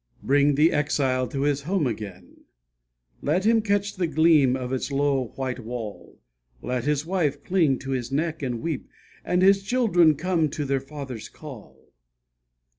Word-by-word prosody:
Bring 145 Hz, +1 st, +3 dB
the 155 Hz, +4 st, +4 dB
exile 135 Hz, -3 st, 0 dB
to 135 Hz, +3 st, -4 dB
his 145 Hz, 0 st, +1 dB
home 175 Hz, +2 st, 0 dB
again, 105 Hz, -6 st, -6 dB, 0.8 s
Let 175 Hz, +7 st, 0 dB
him 225 Hz, 0 st, +4 dB
catch 205 Hz, -1 st, 0 dB
the 180 Hz, -2 st, 0 dB
gleam 155 Hz, -4 st, +4 dB
of 130 Hz, 0 st, -4 dB
its 130 Hz, +2 st, -2 dB
low 140 Hz, -2 st, +1 dB
white 130 Hz, -1 st, -3 dB
wall; 115 Hz, -3 st, -7 dB, 0.5 s
Let 125 Hz, 0 st, -2 dB
his 150 Hz, 0 st, 0 dB
wife 155 Hz, -6 st, -1 dB
cling 165 Hz, -8 st, +2 dB
to 135 Hz, -, -5 dB
his 125 Hz, -1 st, -3 dB
neck 160 Hz, +3 st, -1 dB
and 120 Hz, -4 st, -3 dB
weep, 160 Hz, -5 st, -3 dB, 0.4 s
And 180 Hz, +1 st, +1 dB
his 195 Hz, +1 st, +5 dB
children 195 Hz, -8 st, +3 dB
come 170 Hz, +1 st, 0 dB
at 150 Hz, -, -4 dB
their 140 Hz, -3 st, -1 dB
father's 135 Hz, -5 st, -8 dB
call. 110 Hz, -, -13 dB
145 Hz, 160 wpm, -25 LUFS, 130-170 Hz, 0.8 s, his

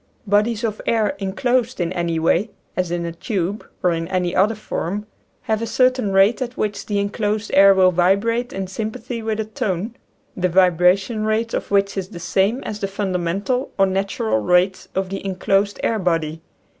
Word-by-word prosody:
Bodies 210 Hz, +3 st, +1 dB
of 215 Hz, -2 st, -2 dB
air 220 Hz, -3 st, +2 dB
inclosed 240 Hz, +5 st, 0 dB
in 175 Hz, 0 st, -1 dB
any 170 Hz, -2 st, -1 dB
way, 170 Hz, +6 st, +2 dB, 0.3 s
as 180 Hz, -2 st, -1 dB
in 170 Hz, 0 st, -2 dB
a 170 Hz, -, -3 dB
tube, 195 Hz, +2 st, -3 dB, 0.2 s
or 180 Hz, -, +4 dB
in 165 Hz, 0 st, -2 dB
any 180 Hz, -1 st, -1 dB
other 210 Hz, +4 st, +3 dB
form, 210 Hz, -1 st, -4 dB, 0.4 s
have 220 Hz, 0 st, -1 dB
a 230 Hz, -, -2 dB
cer 255 Hz, +2 st, +4 dB
tain 250 Hz, -5 st, -3 dB
rate 195 Hz, +6 st, +4 dB
at 250 Hz, -1 st, -4 dB
which 205 Hz, -1 st, -2 dB
the 205 Hz, -, -1 dB
inclosed 210 Hz, +1 st, -1 dB
air 195 Hz, 0 st, +7 dB
will 185 Hz, -1 st, +5 dB
vibrate 200 Hz, +7 st, +1 dB
in 195 Hz, 0 st, -3 dB
sympathy 220 Hz, +5 st, -5 dB
with 220 Hz, -1 st, -2 dB
a 220 Hz, -, -1 dB
tone, 210 Hz, +1 st, -3 dB, 0.4 s
the 180 Hz, 0 st, 0 dB
vibration 185 Hz, +4 st, +3 dB
rate 220 Hz, +1 st, 0 dB
of -, -, -3 dB
which 200 Hz, 0 st, +2 dB
is 190 Hz, -1 st, -2 dB
the 175 Hz, -, -10 dB
same 195 Hz, +8 st, +1 dB
as 210 Hz, -, -5 dB
the 195 Hz, -, -1 dB
fundamental 195 Hz, +5 st, -1 dB
or 195 Hz, -, +5 dB
natural 190 Hz, -, 0 dB
rate 180 Hz, -, +2 dB
of 190 Hz, 0 st, -1 dB
the 195 Hz, -, -5 dB
inclosed 195 Hz, +1 st, 0 dB
air 225 Hz, -, +1 dB
body. 165 Hz, -3 st, -1 dB
195 Hz, 185 wpm, -21 LUFS, 180-220 Hz, 0.4 s, air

